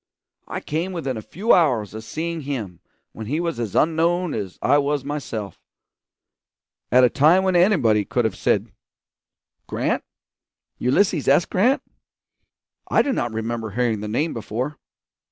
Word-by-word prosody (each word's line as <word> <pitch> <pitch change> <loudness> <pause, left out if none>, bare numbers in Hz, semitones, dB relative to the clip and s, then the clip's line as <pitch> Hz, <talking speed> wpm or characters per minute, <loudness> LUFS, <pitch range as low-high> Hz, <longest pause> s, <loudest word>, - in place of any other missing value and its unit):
I - - -5
came 170 +5 -3
within 135 -7 -3
a 110 - -5
few 200 - +1
hours 125 - +2
of 110 0 -7
seeing 165 +6 -4
him 115 - -5 0.3
when 110 -1 -8
he 150 +7 -1
was 170 -5 -2
as 115 -5 -4
unknown 165 +2 +2
as 100 -4 -5
I 145 - +3
was 145 -1 0
myself; 130 -8 -5 1.3
at 125 +1 +6
a 125 - +6
time 160 +7 +4
when 190 -1 +1
anybody 150 - +4
could 120 +4 -1
have 110 - -1
said, - - 0 1.0
'Grant? - - -1 0.8
Ulysses 150 +4 +2
S. 145 +5 +5
Grant? 245 +9 +2 1.1
I - - +4
do 280 - 0
not 120 - -1
remember 110 0 -3
hearing 115 0 0
the 105 - -5
name 150 +10 -1
before.' 125 +6 -4
140 Hz, 150 wpm, -22 LUFS, 110-170 Hz, 1.3 s, at